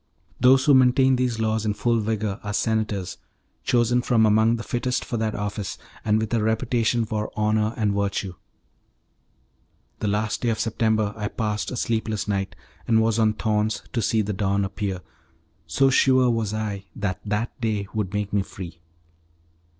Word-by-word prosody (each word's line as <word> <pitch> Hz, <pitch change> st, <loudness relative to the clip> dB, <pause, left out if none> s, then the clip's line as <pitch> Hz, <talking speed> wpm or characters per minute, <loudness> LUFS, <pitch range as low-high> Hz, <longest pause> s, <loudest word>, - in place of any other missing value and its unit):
Those 130 Hz, +1 st, +5 dB
who 145 Hz, -, +6 dB
maintain 130 Hz, 0 st, +5 dB
these 125 Hz, -2 st, 0 dB
laws 110 Hz, -1 st, 0 dB
in 105 Hz, -1 st, -1 dB
full 120 Hz, 0 st, +1 dB
vigour 110 Hz, -2 st, -2 dB
are 105 Hz, -1 st, -4 dB
senators, 110 Hz, -5 st, -1 dB, 0.4 s
chosen 120 Hz, 0 st, +2 dB
from 115 Hz, -2 st, +3 dB
amongst 110 Hz, +2 st, +4 dB
the 115 Hz, -, -6 dB
fittest 125 Hz, +1 st, -2 dB
for 120 Hz, -, -3 dB
that 110 Hz, -1 st, -1 dB
office, 105 Hz, -1 st, -4 dB, 0.3 s
and 105 Hz, 0 st, +2 dB
with 110 Hz, 0 st, -2 dB
a 115 Hz, -, +2 dB
reputation 115 Hz, +1 st, +1 dB
for 105 Hz, 0 st, -3 dB
honour 110 Hz, +1 st, +1 dB
and 105 Hz, -3 st, +1 dB
virtue. 100 Hz, -2 st, -1 dB, 1.7 s
The 105 Hz, -, -2 dB
last 105 Hz, +1 st, -1 dB
day 120 Hz, -, +1 dB
of 110 Hz, -, -1 dB
September 110 Hz, -2 st, +1 dB
I 105 Hz, -2 st, -3 dB
passed 105 Hz, -1 st, -2 dB
a 125 Hz, -, -5 dB
sleepless 110 Hz, -3 st, -1 dB
night, 95 Hz, -2 st, -2 dB, 0.3 s
and 110 Hz, -1 st, +4 dB
was 110 Hz, 0 st, +2 dB
on 110 Hz, -1 st, +3 dB
thorns 110 Hz, 0 st, -1 dB
to 115 Hz, -, 0 dB
see 110 Hz, 0 st, +1 dB
the 105 Hz, +1 st, -3 dB
dawn 100 Hz, 0 st, 0 dB
appear, 95 Hz, -1 st, -3 dB, 0.7 s
so 135 Hz, +12 st, +3 dB
sure 130 Hz, -1 st, +4 dB
was 115 Hz, -3 st, -1 dB
I 105 Hz, -2 st, -3 dB
that 100 Hz, -3 st, -2 dB
that 105 Hz, +4 st, -3 dB
day 105 Hz, -3 st, -1 dB
would 105 Hz, -4 st, -2 dB
make 105 Hz, -1 st, -3 dB
me 100 Hz, -, +3 dB
free. 90 Hz, -3 st, -9 dB
110 Hz, 170 wpm, -24 LUFS, 105-115 Hz, 1.7 s, who